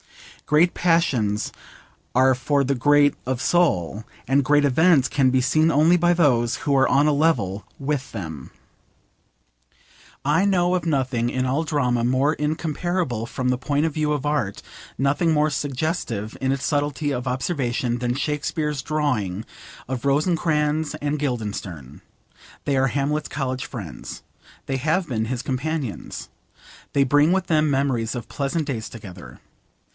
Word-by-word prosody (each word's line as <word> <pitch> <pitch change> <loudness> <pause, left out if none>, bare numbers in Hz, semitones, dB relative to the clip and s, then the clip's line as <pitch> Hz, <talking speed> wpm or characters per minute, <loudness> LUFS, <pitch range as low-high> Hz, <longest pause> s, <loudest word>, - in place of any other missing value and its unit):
Great 160 +4 +4
passions 135 - +1 0.6
are 130 +1 +5
for 140 +3 +1
the 140 +1 0
great 145 +3 +4
of 130 -1 -2
soul, 115 - +1 0.2
and 135 +2 +3
great 145 +1 +3
events 145 0 +4
can 135 -3 +2
be 130 0 +2
seen 155 +5 +3
only 160 +4 +4
by 175 0 +3
those 125 -9 +2
who 140 - +2
are 135 - +4
on 140 +3 +4
a 150 - +3
level 120 - +1
with 140 -1 -2
them. 80 - -7 1.8
I 155 +6 +3
know 180 -3 +2
of 175 -3 -2
nothing 130 -6 0
in 130 +1 -1
all 135 +5 0
drama 125 -6 0
more 130 +5 +2
incomparable 155 -4 -2
from 125 +1 -3
the 125 0 +1
point 145 +3 0
of 160 - -1
view 150 -1 0
of 145 -1 -1
art, 145 -10 -1 0.4
nothing 145 +5 +1
more 155 0 +2
suggestive 130 -7 -3
in 135 0 +1
its 135 0 -2
subtlety 145 0 0
of 125 -1 -3
observation, 125 -3 -1
than 120 0 -1
Shakespeare's 150 +1 -2
drawing 125 -11 -1 0.4
of 125 -1 -4
Rosencrantz 150 0 +1
and 150 0 -2
Guildenstern. 100 - -4 0.6
They 140 - +1
are 135 0 +3
Hamlet's 145 +3 -1
college 130 -2 -3
friends. - - -8 0.4
They 135 - -2
have 160 +6 0
been 110 -5 -1
his 125 +1 -3
companions. 135 -2 -4 0.6
They 140 - +3
bring 145 +4 +4
with 190 -1 +1
them 155 -2 +2
memories 135 -4 0
of 120 - -6
pleasant 150 +3 -2
days 120 -6 -4
together. 95 -6 -11
140 Hz, 150 wpm, -23 LUFS, 125-155 Hz, 1.8 s, are